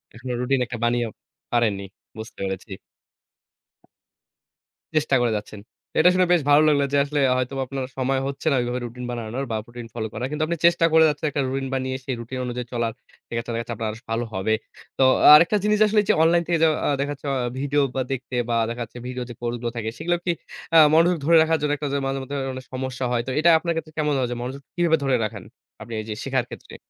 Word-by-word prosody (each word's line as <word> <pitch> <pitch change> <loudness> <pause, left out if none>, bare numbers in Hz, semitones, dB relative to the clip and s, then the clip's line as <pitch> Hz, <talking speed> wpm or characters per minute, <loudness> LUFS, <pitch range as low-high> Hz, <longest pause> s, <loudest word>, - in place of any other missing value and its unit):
এখনো 125 +2 -6
রুটিন 130 +1 +1
একটা 115 0 -6
বানিয়েও 120 -1 +1 0.4
পারেননি 110 -5 +1 0.3
বুঝতে 110 0 -9
পেরেছি। 95 +2 -5 2.2
চেষ্টা 150 -3 +2
করে 120 -2 +2
যাচ্ছেন? 105 0 -8 0.4
এটা 175 +3 +7
শুনে 185 0 +4
বেশ 175 - +3
ভালো 145 +1 +7
লাগলো 145 -2 +3
যে, - - +4
আসলে 145 +1 -2 0.2
হয়তো 130 +1 -2
বা - - -1
আপনার 135 -1 -4
সময় 135 +1 0
হচ্ছে 140 +3 -6
না - - +3
ওইভাবে 120 +1 -2
রুটিন 125 +1 -7
বানানোর 120 +3 -4
বা - - 0
রুটিন 120 -1 -9
ফলো 110 -2 -3
করার। 120 +4 -3
কিন্তু 155 +1 -1
আপনি 170 0 -2
চেষ্টা 170 -1 +5
করে 160 0 +7
যাচ্ছেন, 150 +1 -2
একটা 140 - -1
রুটিন 135 0 -2
বানিয়ে 130 0 -2
সেই 130 -3 -2
রুটিন 120 +2 -6
অনুযায়ী 125 0 -4
চলার, 115 -1 0 0.4
সেখেত্রে 115 0 -4
দেখাচ্ছে 115 +1 -3
আপনার 110 -1 -2 0.2
ভালো 115 +1 -1
হবে। 95 +3 0 0.4
তো - - +4 0.3
আরেকটা 170 +7 +7
জিনিস 210 0 +2
আসলে 210 0 +3
এই - - -10
যে, - - +6
অনলাইন 170 +1 +4
যে, 170 - -8
থেকে 170 - +3 0.3
আ - - +2
দেখাচ্ছে 145 0 -4
আ - - 0 0.2
ভিডিও 145 +1 +1
বা 130 - +1
দেখতে 130 -1 -4
বা 120 - +1
দেখাচ্ছে 120 0 -6
ভিডিও 125 0 -4
যে, - - -6
কোর্স 120 0 -2
গুলো 120 -1 -2
থাকে, 110 -1 -2
সেগুলাও 175 +4 0
কি 175 - +2 0.4
আ - - +9 0.2
মনোযোগ 170 +2 +4
ধরে 165 +2 +5
রাখার 160 0 +1
জন্য 150 -1 0
একটা 145 0 -3
যে, - - +1
মাঝে 135 0 -2
মধ্যে 135 +2 -6 0.2
অনেক 130 0 -8
সমস্যা 130 0 -3
হয়। 120 -1 +1
তো 130 - -2
এটা 165 +2 +5
আপনার 170 0 -1
ক্ষেত্রে 155 -1 -5
কেমন 150 -1 +1
হয়? 125 - 0
যে, - - -2
মনোযোগ 130 +3 -5
কিভাবে 170 -2 +3
ধরে 135 -1 +2
রাখেন 105 -3 -6 0.4
আপনি 115 - -8
এই 110 - -5
যে, - - -2
শেখার 130 -2 0
ক্ষেত্রে? - - -11
130 Hz, 220 wpm, -23 LUFS, 120-150 Hz, 2.2 s, আ